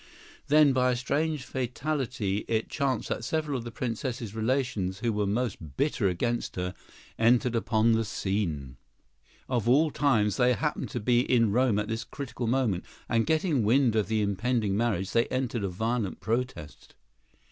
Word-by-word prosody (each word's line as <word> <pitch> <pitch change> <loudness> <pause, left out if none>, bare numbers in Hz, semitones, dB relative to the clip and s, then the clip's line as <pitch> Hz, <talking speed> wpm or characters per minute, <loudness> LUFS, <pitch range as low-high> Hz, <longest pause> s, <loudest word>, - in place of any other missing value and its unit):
Then, 150 -1 +5
by 125 0 +3
a - - +1
strange 145 +4 -1
fatality, 125 -5 -2
it 110 -1 -1
chanced 135 -5 -1
that - - -2
several 155 +2 -1
of 125 - -3
the 120 - -6
Princess's 120 -2 -4
relations, 110 -5 -1
who 115 -2 0
were 105 -1 0
most 100 - -3
bitter 140 -7 +1
against 120 +7 -2
her, 90 0 -3 0.5
entered 120 +1 +3
upon 110 0 +2
the 115 0 +2
scene. 85 - -3 0.7
Of 120 -3 0
all 150 +5 +4
times, 110 -10 +2
they 125 0 +4
happened 150 +4 -2
to 120 - -3
be 120 +2 +3
in 115 -3 +3
Rome 120 -1 +2
at 105 0 -1
this 115 +1 -3
critical 130 -1 -5
moment, 115 -7 +1 0.2
and, 115 -1 +1
getting 160 -3 +2
wind 120 +1 +3
of 110 -2 +1
the 110 -1 +1
impending 105 +1 0
marriage, 100 -4 0
they 115 0 +2
entered 130 -4 -2
a 100 - -1
violent 110 +2 -2
protest. 115 -10 -4
115 Hz, 165 wpm, -28 LUFS, 105-130 Hz, 0.7 s, Then